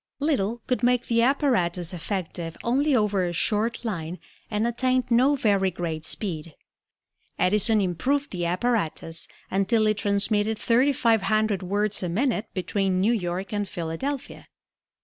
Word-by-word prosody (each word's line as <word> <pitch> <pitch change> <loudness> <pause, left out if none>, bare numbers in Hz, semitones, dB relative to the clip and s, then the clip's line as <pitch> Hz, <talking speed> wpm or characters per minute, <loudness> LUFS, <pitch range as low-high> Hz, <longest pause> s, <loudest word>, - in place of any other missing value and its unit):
Little 240 -6 0
could 250 - -1
make 245 0 +2
the 230 -1 +2
apparatus 230 - +1
effective 170 -2 -4
only 275 +4 +2
over 210 -4 +2
a 175 -1 -2
short 225 +6 0
line 175 -5 -4 0.3
and 210 +1 0
attained 255 +1 0
no 260 +5 +4
very 200 -7 +2
great 165 -3 -4
speed. 165 -7 -4 0.8
Edison 210 +4 +3
improved 230 - 0
the 175 -2 -2
apparatus 175 -4 0 0.2
until 195 +3 +2
it 215 -1 +2
transmitted 205 +1 +2
thirty 250 +6 +3
five 230 -5 +2
hundred 215 -2 +1
words 205 +3 -1
a 180 - -2
minute 220 +3 0
between 190 0 0
New 210 +5 +3
York 185 -1 -3
and 205 -2 -2
Philadelphia. 175 - -5
210 Hz, 140 wpm, -25 LUFS, 180-235 Hz, 0.8 s, no